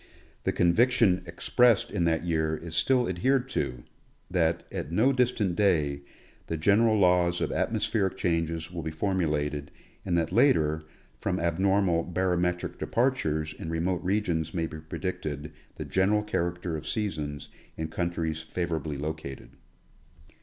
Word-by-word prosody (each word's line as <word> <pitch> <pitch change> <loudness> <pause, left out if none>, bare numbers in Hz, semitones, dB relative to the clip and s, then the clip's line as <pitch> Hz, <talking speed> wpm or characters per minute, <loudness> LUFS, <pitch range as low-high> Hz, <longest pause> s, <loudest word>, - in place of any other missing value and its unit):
The - - +2
conviction 105 +1 +3
expressed 120 -4 +3
in 85 - 0
that 80 0 +1
year 80 -2 0
is 85 0 -7
still 125 +9 +3
ad 90 - -3
hered 130 +6 +2
to 60 - -2 0.2
— - - -31
that, 85 -2 +1
at - - -4
no 115 +10 +3
distant 120 -8 +1
day, 75 -8 +2 0.5
the 80 - -2
general 110 +7 +4
laws 90 -2 +3
of - - -1
atmos - - 0
pheric 95 -3 0
changes 85 -1 -1
will 85 -2 -4
be 80 - -3
formulated, 75 -4 -1 0.3
and 85 - 0
that 80 -1 0
later, 80 - +3 0.4
from 95 +4 -1
abnormal 90 +1 +2
barometric 90 0 -1
departures 80 - 0
in 80 - -7
remote 85 +2 -1
regions 90 -5 0
may 85 -2 0
be 80 -1 -7
predicted 80 -3 -5 0.2
the - - -6
general 100 +3 +2
character 85 -4 -2
of 75 0 -6
seasons 75 - -3 0.3
in 80 - -2
countries 80 -2 -2
favorably 80 -2 -3
located. 75 -2 -6
85 Hz, 145 wpm, -28 LUFS, 80-95 Hz, 0.5 s, general